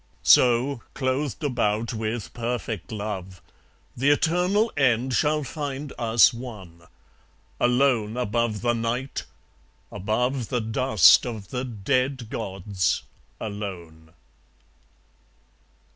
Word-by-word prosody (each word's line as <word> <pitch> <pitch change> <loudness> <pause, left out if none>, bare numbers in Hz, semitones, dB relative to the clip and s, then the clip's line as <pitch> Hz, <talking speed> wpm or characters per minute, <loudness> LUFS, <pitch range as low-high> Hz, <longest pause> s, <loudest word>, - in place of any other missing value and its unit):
So, 125 +1 +4
clothed 135 +1 -2
about 115 -4 0
with 110 0 -4
perfect 115 -5 -4
love, 100 -4 -5 0.6
The 135 +4 +2
eternal 180 +9 +2
end 130 -2 +2
shall 150 +3 +1
find 145 -1 -5
us 115 0 +4
one, 95 -9 -10 0.7
Alone 120 -3 +2
above 115 -2 -1
the 120 -1 +2
Night, 120 +3 -3 0.7
above 120 +5 -1
The 125 - 0
dust 110 -1 +5
of 110 -5 -6
the 125 0 -2
dead 125 +2 -1
gods, 95 -5 -2 0.4
alone. 85 -7 -7
120 Hz, 95 wpm, -25 LUFS, 105-130 Hz, 0.7 s, dust